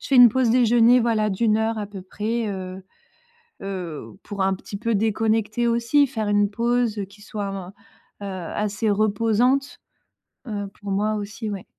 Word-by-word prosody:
je -, -, -8 dB
fais 275 Hz, -, +3 dB
une 245 Hz, -1 st, +9 dB
pause 255 Hz, +1 st, +2 dB
déjeuner, 240 Hz, +1 st, +5 dB
voilà, 225 Hz, -2 st, +1 dB
d'1 215 Hz, +2 st, +1 dB
heure, 220 Hz, +1 st, 0 dB
à 210 Hz, -1 st, -3 dB
peu 200 Hz, -1 st, -9 dB
près. 215 Hz, +5 st, -3 dB
Heu 190 Hz, -1 st, -6 dB, 0.8 s
heu, 180 Hz, -6 st, -5 dB, 0.2 s
pour 200 Hz, -2 st, -4 dB
un 190 Hz, 0 st, +2 dB
petit 195 Hz, +2 st, -8 dB
peu 230 Hz, +2 st, -1 dB
déconnecter, 220 Hz, +2 st, +1 dB
aussi. 235 Hz, +5 st, +3 dB
Faire 220 Hz, -5 st, -3 dB
une 205 Hz, -1 st, +2 dB
pause, 235 Hz, 0 st, 0 dB
heu, 200 Hz, -, -1 dB
qui 200 Hz, +2 st, -17 dB
soit 205 Hz, -1 st, -5 dB
en 195 Hz, -2 st, -6 dB, 0.6 s
heu, -, -, -4 dB
assez 205 Hz, +4 st, -2 dB
reposante, 225 Hz, +6 st, +1 dB, 0.7 s
heu, 205 Hz, -2 st, -3 dB
pour 200 Hz, -1 st, -6 dB
moi 210 Hz, +2 st, +1 dB
aussi, 215 Hz, +1 st, -5 dB
ouais. 195 Hz, -2 st, -6 dB
215 Hz, 175 wpm, -23 LUFS, 200-230 Hz, 0.8 s, une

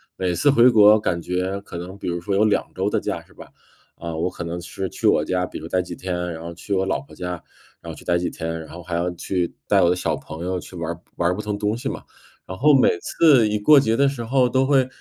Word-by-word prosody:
每 90 Hz, -1 st, -1 dB
次 145 Hz, +11 st, +2 dB
回 125 Hz, -2 st, +6 dB
国 105 Hz, -2 st, +7 dB
感 85 Hz, -5 st, -1 dB
觉 90 Hz, +3 st, -2 dB
可 95 Hz, -, -12 dB
能 90 Hz, +3 st, -7 dB
比 -, -, -7 dB
如 85 Hz, 0 st, -2 dB
说 100 Hz, +2 st, -3 dB
有 105 Hz, +2 st, +3 dB
2 105 Hz, -, +2 dB
周 95 Hz, +2 st, -1 dB
的 -, -, 0 dB
假 -, -, -3 dB
是 -, -, -23 dB
吧， -, -, -13 dB, 0.5 s
啊， 85 Hz, -1 st, -6 dB
我 85 Hz, +3 st, -1 dB
可 90 Hz, -1 st, -7 dB
能 85 Hz, +1 st, -5 dB
是 95 Hz, +2 st, -5 dB
去 -, -, -1 dB
我 -, -, +3 dB
家， 90 Hz, 0 st, 0 dB
比 -, -, -8 dB
如 80 Hz, -, -8 dB
待 90 Hz, +1 st, +1 dB
几 90 Hz, -1 st, -7 dB
天， 90 Hz, +1 st, -5 dB, 0.2 s
然 80 Hz, -, -8 dB
后 85 Hz, 0 st, -7 dB
去 100 Hz, +4 st, -6 dB
我 95 Hz, 0 st, +1 dB
老 95 Hz, -, -1 dB
婆 140 Hz, -, -17 dB
家， 90 Hz, 0 st, -5 dB, 0.5 s
然 -, -, -7 dB
后 -, -, -8 dB
去 -, -, -14 dB
待 85 Hz, 0 st, +2 dB
几 90 Hz, -, -1 dB
天， 80 Hz, 0 st, -5 dB
然 80 Hz, -, -11 dB
后 85 Hz, -, -9 dB
还 85 Hz, 0 st, -5 dB
要 85 Hz, +1 st, 0 dB
去 90 Hz, 0 st, -2 dB
带 -, -, +4 dB
我 85 Hz, -, +4 dB
的 90 Hz, -, +2 dB
小 85 Hz, -3 st, -1 dB
朋 80 Hz, +4 st, -8 dB
友 90 Hz, 0 st, -1 dB
去 90 Hz, +1 st, -9 dB
玩 85 Hz, -1 st, -4 dB
儿 85 Hz, -, -15 dB, 0.2 s
玩 85 Hz, 0 st, +2 dB
儿 -, -, +1 dB
不 105 Hz, -, -4 dB
同 105 Hz, -1 st, -3 dB
东 105 Hz, +1 st, 0 dB
西 135 Hz, +2 st, -3 dB
嘛。 -, -, -6 dB, 0.4 s
然 95 Hz, 0 st, -7 dB
后 150 Hz, +3 st, +5 dB
每 130 Hz, -, +5 dB
次 135 Hz, -10 st, +4 dB
一 105 Hz, 0 st, -1 dB
过 145 Hz, +8 st, +6 dB
节 115 Hz, -3 st, +1 dB
的 140 Hz, 0 st, +4 dB
时 130 Hz, -4 st, -3 dB
候 125 Hz, +1 st, +2 dB
都 130 Hz, +2 st, +2 dB
会 135 Hz, -3 st, +3 dB
95 Hz, 305 characters per minute, -22 LUFS, 85-110 Hz, 0.5 s, 国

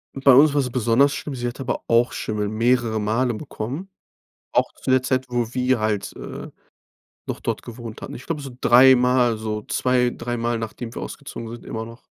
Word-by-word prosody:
Bei 135 Hz, 0 st, +5 dB
uns 140 Hz, +3 st, +7 dB
war 145 Hz, -, +3 dB
es 125 Hz, -, -2 dB
besonders 125 Hz, +4 st, +3 dB
schlimm. 140 Hz, -1 st, -5 dB
Sie 120 Hz, 0 st, -3 dB
hat 120 Hz, -, -6 dB
aber 130 Hz, -2 st, -2 dB
auch 120 Hz, +1 st, +3 dB
Schimmel 105 Hz, -1 st, -2 dB
mehrere 115 Hz, +1 st, +1 dB
Male 115 Hz, +4 st, +1 dB
bekommen. 135 Hz, -, -6 dB, 0.6 s
Auch -, -, +2 dB
zu -, -, -7 dB
der 130 Hz, 0 st, +4 dB
Zeit, 130 Hz, 0 st, 0 dB
wo 120 Hz, -1 st, -1 dB
wir 130 Hz, -1 st, +1 dB
halt, 110 Hz, -2 st, -1 dB
äh, -, -, -7 dB, 0.8 s
noch -, -, -4 dB
dort -, -, -2 dB
gewohnt 115 Hz, -2 st, -9 dB
hatten. -, -, -7 dB
Ich -, -, -10 dB
glaube 165 Hz, -3 st, -3 dB
so 135 Hz, -2 st, -7 dB
dreimal, 125 Hz, -2 st, +5 dB
so 105 Hz, -1 st, -3 dB
zwei 125 Hz, -1 st, +1 dB
dreimal 120 Hz, -1 st, -2 dB
nachdem 115 Hz, +1 st, -6 dB
wir -, -, -5 dB
ausgezogen 115 Hz, -, -7 dB
sind, 120 Hz, -, -10 dB
immer 110 Hz, 0 st, -5 dB
noch. 115 Hz, +1 st, -13 dB
120 Hz, 190 wpm, -23 LUFS, 115-130 Hz, 0.8 s, uns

